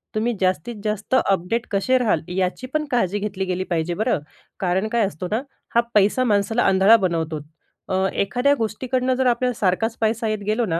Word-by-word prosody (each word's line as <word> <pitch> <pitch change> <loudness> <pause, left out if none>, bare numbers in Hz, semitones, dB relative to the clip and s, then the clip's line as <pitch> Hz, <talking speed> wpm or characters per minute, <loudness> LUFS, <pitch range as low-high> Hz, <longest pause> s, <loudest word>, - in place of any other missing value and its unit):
तुम्ही 230 +3 0
जास्तीत 185 +4 0
जास्त 215 +3 -1
अपडेट 195 +5 0
कसे 205 +6 +2
राहाल, 220 -10 +1 0.2
याची 190 +7 -1
पण 305 0 0
काळजी 205 -5 +1
घेतली 200 -2 -3
गेली 185 0 -2
पाहिजे 170 0 -1
बरं. 220 0 0 0.4
कारण 190 +3 0
काय 230 -1 +2
असतो 180 +1 -6
ना, 220 +3 +1 0.3
हा 235 - +6
पैसा 210 +5 +4
माणसाला 220 +1 +1
आंधळा 195 +4 +6
बनवतो. 165 -5 -1 0.5
अ, 190 0 +1
एखाद्या 245 +8 +2
गोष्टीकडनं 255 +3 -1
जर 260 +1 0
आपल्याला 250 +1 +1
सारखाच 220 +4 0
पैसा 225 +1 +1
येत 215 -1 -1
गेलो 220 +3 +1
ना, 165 -4 -1
210 Hz, 180 wpm, -22 LUFS, 185-235 Hz, 0.5 s, हा